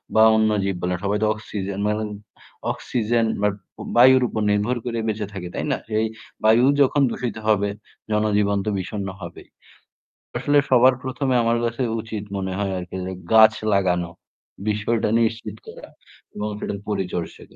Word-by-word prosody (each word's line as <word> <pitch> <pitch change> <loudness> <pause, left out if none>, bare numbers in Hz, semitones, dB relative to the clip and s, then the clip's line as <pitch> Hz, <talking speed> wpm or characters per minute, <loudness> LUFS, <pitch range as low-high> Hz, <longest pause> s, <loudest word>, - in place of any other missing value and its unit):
বা 110 - +7
অন্য 110 0 +3
জীব 95 -1 -1
বলে। 90 0 0
সবাই 100 +1 +1
তো - - +3
অক্সিজেন 100 -2 -5
মা - - +2 0.8
অক্সিজেন 115 -1 0 0.2
বাট 105 -1 +3 0.4
বায়ুর 130 +1 +7
উপর 110 - -3
নির্ভর 105 +5 +1
করে 115 -1 -2
বেঁচে 105 -2 -2
থাকে, 90 -3 -6
তাই - - -2
না? - - +1
যে - - -6
এই 110 - +1 0.4
বায়ু 115 +3 +5 0.2
যখন 140 +1 +3
দূষিত 125 -3 -3
হবে 100 -1 +3 0.4
জনজীবন 105 -1 +2
তো - - 0
বিষণ্ণ 100 +1 -4
হবেই। 85 -1 -9 0.9
আসলে 145 0 +3
সবার 130 +1 +6
১ম 130 +1 -3
এ - - +4
আমার 115 0 +2
কাছে 115 +3 -2 0.2
উচিত 110 -2 -6
মনে 95 -1 -3
হয় 100 -1 -1
আরকি 90 +1 -7
যে 95 - -4 0.2
গাছ 110 0 +8 0.2
লাগানো 90 -3 +1 0.6
বিষয়টা 105 +2 0
নিশ্চিত 110 -2 -1
করা - - -10 0.5
এবং 105 +1 -3
সেটার 100 - -3
পরিচর্চা 90 -4 -3
105 Hz, 160 wpm, -22 LUFS, 100-115 Hz, 0.9 s, গাছ